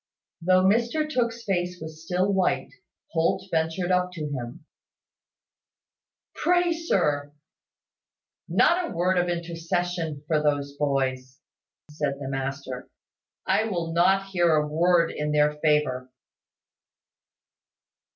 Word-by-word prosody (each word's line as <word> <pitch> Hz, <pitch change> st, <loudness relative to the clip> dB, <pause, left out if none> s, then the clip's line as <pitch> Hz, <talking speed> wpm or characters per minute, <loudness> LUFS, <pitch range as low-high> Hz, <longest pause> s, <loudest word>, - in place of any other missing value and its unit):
Though 185 Hz, +2 st, +4 dB
Mr 235 Hz, +10 st, +2 dB
Tooke's 235 Hz, -5 st, -1 dB
face 180 Hz, -3 st, -1 dB
was 160 Hz, 0 st, -9 dB
still 185 Hz, +4 st, 0 dB
white, 190 Hz, -1 st, 0 dB, 0.4 s
Holt 165 Hz, +3 st, +1 dB
ventured 165 Hz, +3 st, 0 dB
up 180 Hz, 0 st, +2 dB
to 160 Hz, -4 st, -4 dB
him, 130 Hz, +4 st, -6 dB, 1.7 s
"Pray, 350 Hz, -1 st, +2 dB
sir 150 Hz, -, 0 dB, 0.6 s
" -, -, -41 dB
"Not 345 Hz, 0 st, +3 dB
a -, -, -8 dB
word 180 Hz, +2 st, +2 dB
of 175 Hz, 0 st, 0 dB
intercession 170 Hz, -2 st, -2 dB
for 155 Hz, -1 st, +1 dB
those 145 Hz, -1 st, 0 dB
boys," 130 Hz, -2 st, -1 dB, 0.5 s
said 150 Hz, -2 st, -2 dB
the 135 Hz, -2 st, -5 dB
master. 135 Hz, -1 st, -4 dB, 0.6 s
"I 220 Hz, -, +2 dB
will 170 Hz, -6 st, -2 dB
not 190 Hz, +3 st, +3 dB
hear 175 Hz, -3 st, +3 dB
a 150 Hz, 0 st, +1 dB
word 170 Hz, +2 st, +3 dB
in 150 Hz, 0 st, -2 dB
their 150 Hz, 0 st, +4 dB
favour." 150 Hz, -5 st, +1 dB
165 Hz, 115 wpm, -26 LUFS, 150-185 Hz, 1.7 s, Though